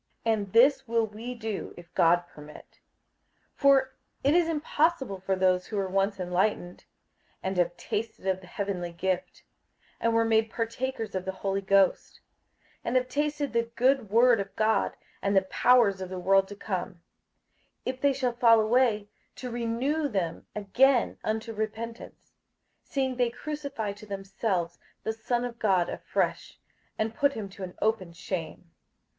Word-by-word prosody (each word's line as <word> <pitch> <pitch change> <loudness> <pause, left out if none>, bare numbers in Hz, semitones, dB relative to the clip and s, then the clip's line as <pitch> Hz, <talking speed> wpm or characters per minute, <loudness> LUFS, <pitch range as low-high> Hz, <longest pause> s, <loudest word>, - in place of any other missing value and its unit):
58:006:003 225 - +4
And 200 -3 -4
this 265 +3 +5
will 230 0 +2
we 225 +4 -7
do, 220 -3 -5
if 175 0 -13
God 175 +1 +4
permit. 150 -3 -14 0.8
58:006:004 - - -42
For 270 -2 +4 0.3
it 280 +2 +4
is 340 -1 +3
impossible 300 - 0
for 190 +1 -1
those 185 -1 +2
who 215 - -4
were 195 -1 0
once 195 +1 0
enlightened, 180 0 -1 0.6
and 190 +1 -2
have 175 0 +1
tasted 220 -2 -4
of 190 -1 0
the 180 - -14
heavenly 180 -2 -3
gift, 180 +1 -2 0.6
and 230 0 +1
were 230 0 +4
made 225 0 +3
partakers 230 +1 -3
of 185 -1 -3
the 190 - -1
Holy 195 +1 -2
Ghost, 195 -1 +2 0.6
58:006:005 - - -43
And 235 - -1
have 255 0 +2
tasted 295 0 -1
the 230 0 0
good 255 -3 +2
word 235 +2 +5
of 195 0 -5
God, 220 0 +1 0.2
and 200 0 +2
the 190 - +5
powers 200 -1 +3
of 185 - -5
the 185 - -5
world 195 +1 +3
to 205 - -9
come, 195 0 -3
58:006:006 - - -27 0.9
If 255 0 -3
they 280 -1 +4
shall 255 -2 -1
fall 235 -2 +6
away, 220 -2 +2 0.3
to 250 -1 -6
renew 240 +6 0
them 185 -9 -3
again 240 +5 +3
unto 220 +1 -2
repentance; 225 +2 -6 0.5
seeing 265 -2 -2
they 245 -2 +2
crucify 280 -6 -4
to 210 +1 -13
themselves 195 -3 -2 0.2
the 220 - -1
Son 240 +2 -1
of 240 -1 -7
God 185 -5 +2
afresh, - - -2 0.4
and 220 +1 -1
put 285 +3 +2
him 215 -5 -5
to 195 - -13
an 180 -1 -6
open 210 -6 0
shame. 165 - -6
220 Hz, 165 wpm, -28 LUFS, 190-245 Hz, 0.9 s, fall